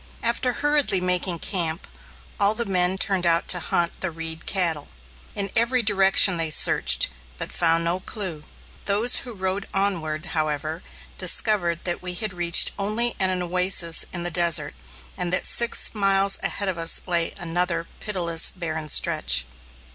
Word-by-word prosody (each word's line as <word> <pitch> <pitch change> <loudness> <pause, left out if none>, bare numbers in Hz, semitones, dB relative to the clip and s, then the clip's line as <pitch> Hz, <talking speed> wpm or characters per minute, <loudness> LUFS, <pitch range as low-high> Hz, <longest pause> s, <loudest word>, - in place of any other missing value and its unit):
After 235 +2 -1
hurriedly 295 -8 0
making 180 -1 0
camp, 165 -2 -2 0.5
all 205 +1 +2
the 235 +1 -2
men 185 -1 0
turned 190 -2 0
out 170 +2 +1
to 180 - +4
hunt 170 0 0
the 190 - -3
Reed 160 -1 -8
cattle. 170 -6 0 0.5
In 200 -1 -3
every 235 +2 +1
direction 195 -3 +4
they 165 -1 0
searched, 155 - +4 0.3
but - - -7
found 165 -1 0
no 170 +2 -2
clue. 185 -6 -4 0.4
Those 210 +5 +3
who 250 - -5
rode 190 -1 -4
onward, 165 -6 -1
however, 155 +1 -3 0.4
discovered 180 -2 +1
that 175 -1 -3
we 180 0 -4
had 210 +1 -3
reached 175 -1 +4
only 220 +4 0
an 185 -2 0
oasis 180 -1 0
in 175 -1 -4
the 175 - -4
desert, 170 -1 +1 0.4
and 175 -1 -4
that 185 - -1
six 235 0 +2
miles 195 -1 +3
ahead 200 - -2
of 185 -3 -3
us 165 0 +2
lay 170 -2 -1
another 175 -1 -3
pitiless 170 -6 +2
barren 160 -4 -7
stretch. 60 - +2
180 Hz, 155 wpm, -22 LUFS, 170-200 Hz, 0.5 s, to